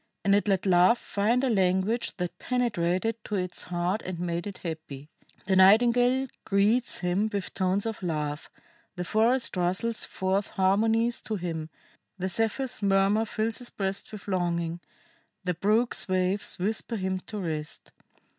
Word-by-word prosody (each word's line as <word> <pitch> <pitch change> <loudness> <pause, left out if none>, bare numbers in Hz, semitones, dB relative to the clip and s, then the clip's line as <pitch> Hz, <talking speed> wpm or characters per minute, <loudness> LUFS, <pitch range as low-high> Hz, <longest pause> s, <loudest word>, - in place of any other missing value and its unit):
And 200 - +4
it 205 +1 +2
let 195 -2 +1
Love 185 +5 +5
find 230 +6 0
a 265 - +2
language 190 +3 +1
that 180 -1 -4
penetrated 225 -3 -1
to 210 - -3
its 180 -2 -2
heart 180 +4 -2
and 185 -2 -6
made 175 +1 -2
it 200 - -7
happy. 155 -4 -7 0.4
The 190 0 +1
nightingale 245 +7 +5 0.2
greets 210 +5 +2
him 185 +4 +1
with 200 -3 -4
tones 190 +2 0
of 225 -3 -4
love, 150 -4 -3 0.5
the 180 - -3
forest 230 +6 +2
rustles 185 +6 0
forth 190 +2 -1
harmonies 225 +5 +1
to 220 - -3
him, 165 -4 -4 0.5
the 190 0 -2
Zephyr's 225 +6 -1
murmur 200 +2 +3
fills 220 +2 -1
his 245 - -6
breast 195 0 -3
with 210 -2 -10
longing, 170 -3 -1 0.6
the 180 -1 0
brook's 215 +7 +1
waves 185 +1 0
whisper 220 +5 -1
him 190 -2 -2
to 215 - -5
rest. 155 -5 -5
195 Hz, 150 wpm, -27 LUFS, 180-220 Hz, 0.6 s, Love